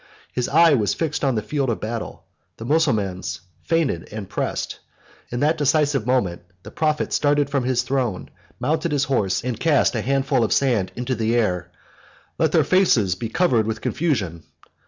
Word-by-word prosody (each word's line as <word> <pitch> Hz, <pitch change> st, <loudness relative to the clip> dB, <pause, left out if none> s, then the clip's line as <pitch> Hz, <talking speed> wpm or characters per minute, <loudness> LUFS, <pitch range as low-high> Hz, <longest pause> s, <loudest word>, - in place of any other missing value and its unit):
His 125 Hz, -1 st, -1 dB
eye 165 Hz, +1 st, +6 dB
was 105 Hz, -7 st, +1 dB
fixed 155 Hz, -3 st, -2 dB
on 135 Hz, -3 st, +2 dB
the 110 Hz, -, -1 dB
field 135 Hz, +4 st, -1 dB
of 115 Hz, -, -1 dB
battle: 115 Hz, +1 st, -5 dB, 0.3 s
the 115 Hz, -, -7 dB
Mussulmans 110 Hz, -, 0 dB, 0.2 s
fainted 160 Hz, -, -1 dB
and 110 Hz, +1 st, -5 dB
were -, -, -22 dB
pressed: -, -, -3 dB, 0.5 s
in 120 Hz, -, -3 dB
that 150 Hz, +2 st, +2 dB
decisive 145 Hz, -4 st, +2 dB
moment 110 Hz, -10 st, 0 dB, 0.2 s
the 105 Hz, -, -10 dB
prophet 155 Hz, -1 st, -1 dB
started 145 Hz, -1 st, +2 dB
from 135 Hz, -3 st, 0 dB
his 125 Hz, -1 st, +1 dB
throne, 125 Hz, -8 st, -2 dB, 0.3 s
mounted 160 Hz, +1 st, 0 dB
his 145 Hz, -1 st, +2 dB
horse, 110 Hz, -10 st, 0 dB
and 125 Hz, -1 st, -3 dB
cast 155 Hz, -4 st, +3 dB
a 115 Hz, -, -1 dB
handful 135 Hz, 0 st, +1 dB
of -, -, +1 dB
sand 120 Hz, -9 st, +1 dB
into 125 Hz, +2 st, -2 dB
the 115 Hz, 0 st, 0 dB
air: 90 Hz, -7 st, 0 dB, 0.7 s
"Let -, -, +2 dB
their -, -, +4 dB
faces 130 Hz, -, +3 dB
be 110 Hz, +5 st, -5 dB
covered 120 Hz, -7 st, +2 dB
with 110 Hz, -, -3 dB
confusion." 105 Hz, -, -1 dB
125 Hz, 180 wpm, -22 LUFS, 110-145 Hz, 0.7 s, eye